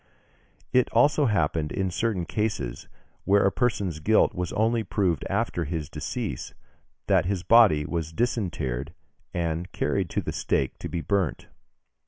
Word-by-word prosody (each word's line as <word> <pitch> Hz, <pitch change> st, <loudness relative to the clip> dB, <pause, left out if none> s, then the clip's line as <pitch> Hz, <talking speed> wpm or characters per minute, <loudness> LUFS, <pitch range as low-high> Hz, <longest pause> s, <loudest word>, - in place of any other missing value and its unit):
It 125 Hz, -1 st, +4 dB
also 145 Hz, +4 st, +4 dB
happened 80 Hz, -6 st, 0 dB
in 95 Hz, -1 st, -1 dB
certain 100 Hz, -3 st, -1 dB
cases, 105 Hz, -, -3 dB, 0.4 s
where 100 Hz, +1 st, +4 dB
a 100 Hz, -, +4 dB
person's 100 Hz, -, -1 dB
guilt 110 Hz, +8 st, +3 dB
was 90 Hz, -2 st, -3 dB
only 115 Hz, +1 st, +1 dB
proved 90 Hz, -3 st, 0 dB
after 100 Hz, -4 st, -1 dB
his 75 Hz, -1 st, -4 dB
decease, 75 Hz, -, -4 dB, 0.5 s
that 95 Hz, -4 st, +3 dB
his 95 Hz, -2 st, -1 dB
body 95 Hz, -8 st, +6 dB
was 80 Hz, 0 st, -3 dB
disinterred, 80 Hz, -, -2 dB, 0.4 s
and 85 Hz, +1 st, -2 dB
carried -, -, -1 dB
to -, -, -1 dB
the -, -, -4 dB
stake 65 Hz, -, -1 dB
to -, -, -5 dB
be 85 Hz, -, -3 dB
burnt. 95 Hz, -4 st, -1 dB
90 Hz, 145 wpm, -26 LUFS, 80-110 Hz, 0.5 s, body